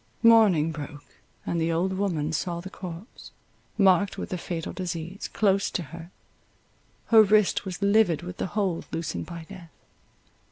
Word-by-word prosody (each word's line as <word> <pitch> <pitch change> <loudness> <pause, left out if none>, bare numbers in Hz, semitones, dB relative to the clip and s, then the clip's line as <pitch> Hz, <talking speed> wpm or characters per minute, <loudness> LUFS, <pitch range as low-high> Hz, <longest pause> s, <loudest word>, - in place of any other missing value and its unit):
Morning 210 -9 +5
broke; 145 -1 -9 0.3
and 170 -1 -1
the 165 +1 +1
old 180 +3 0
woman 170 -6 -1
saw 170 +2 -2
the 190 +2 -9
corpse, 185 +3 -9 0.5
marked 195 -1 +3
with - - -5
the 180 - -3
fatal 170 -2 -5
disease, 175 0 -5
close 200 -2 +2
to 175 - -3
her; 170 0 -9 1.0
her 225 -1 +8
wrist 210 -1 +3
was 190 +1 -5
livid 200 -5 +3
with 180 0 -7
the - - -2
hold 190 -5 -1
loosened 155 - -4
by 170 -1 -8
death. 185 -4 -11
180 Hz, 155 wpm, -26 LUFS, 165-200 Hz, 1.0 s, her